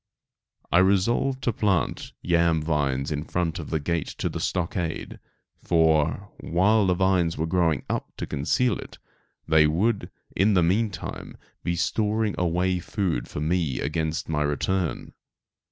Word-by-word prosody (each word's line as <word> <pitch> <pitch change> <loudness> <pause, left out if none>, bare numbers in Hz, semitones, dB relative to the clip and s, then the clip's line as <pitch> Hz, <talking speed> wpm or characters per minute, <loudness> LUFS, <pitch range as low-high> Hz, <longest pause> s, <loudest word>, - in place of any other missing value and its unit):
I 85 - +5
resolved 115 +8 +2
to 120 - +1
plant 100 -4 0
yam 85 -2 +2
vines 70 -3 0
in 75 0 -2
front 85 0 -2
of 75 - -7
the 80 - 0
gate 85 +2 -1
to - - -3
the - - -5
stockade, 85 -2 -3 0.4
for, 80 +3 +2
while 100 +4 +2
the 90 - +3
vines 90 -3 +2
were 80 - 0
growing 80 -4 +1
up - - -3
to - - -3
conceal 120 - 0
it, - - -10 0.5
they 80 -1 +5
would, 100 +8 0 0.3
in 100 +3 +3
the 90 - +4
meantime 100 +4 -2 0.3
be 85 - 0
storing 110 +4 0
away 90 +1 +1
food 85 - -2
for 75 - -5
me 80 -3 0
against 80 +1 -2
my 80 -2 -1
return. 80 +5 -1
85 Hz, 145 wpm, -25 LUFS, 80-95 Hz, 0.5 s, I